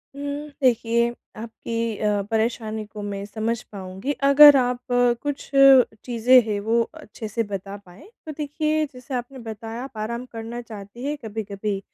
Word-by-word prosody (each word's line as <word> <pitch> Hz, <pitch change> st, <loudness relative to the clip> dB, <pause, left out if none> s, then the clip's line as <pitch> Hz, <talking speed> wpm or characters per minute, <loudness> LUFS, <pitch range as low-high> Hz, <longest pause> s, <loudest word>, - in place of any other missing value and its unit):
उम, 280 Hz, -, -8 dB, 0.4 s
देखिए 235 Hz, -1 st, +3 dB, 0.3 s
आपकी 230 Hz, 0 st, -4 dB
अ, 210 Hz, -1 st, +1 dB
परेशानी 220 Hz, -1 st, -1 dB
को 210 Hz, 0 st, -9 dB
मैं 200 Hz, -1 st, -4 dB
समझ 220 Hz, +2 st, -2 dB
पाऊँगी, 190 Hz, +5 st, -5 dB
अगर 285 Hz, +1 st, +9 dB
आप 250 Hz, -1 st, +1 dB
कुछ 245 Hz, +3 st, 0 dB, 0.6 s
चीज़ें 245 Hz, +1 st, +5 dB
हैं 205 Hz, -2 st, -1 dB
वो 230 Hz, +1 st, +3 dB
अच्छे 300 Hz, -8 st, -9 dB
से 230 Hz, +2 st, -1 dB
बता 195 Hz, -1 st, -6 dB
पाएँ। 180 Hz, -, -15 dB, 0.2 s
तो 310 Hz, -, -5 dB
देखिए, 305 Hz, +1 st, 0 dB
जैसे 250 Hz, +1 st, -10 dB
आपने 250 Hz, +2 st, -4 dB
बताया 225 Hz, +2 st, -6 dB
आप 265 Hz, -4 st, -10 dB
आराम 235 Hz, +3 st, -4 dB
करना 230 Hz, 0 st, -7 dB
चाहती 220 Hz, +1 st, -10 dB
हैं 295 Hz, +1 st, -2 dB
कभी-कभी, 205 Hz, -2 st, -4 dB
230 Hz, 150 wpm, -23 LUFS, 215-250 Hz, 0.6 s, अगर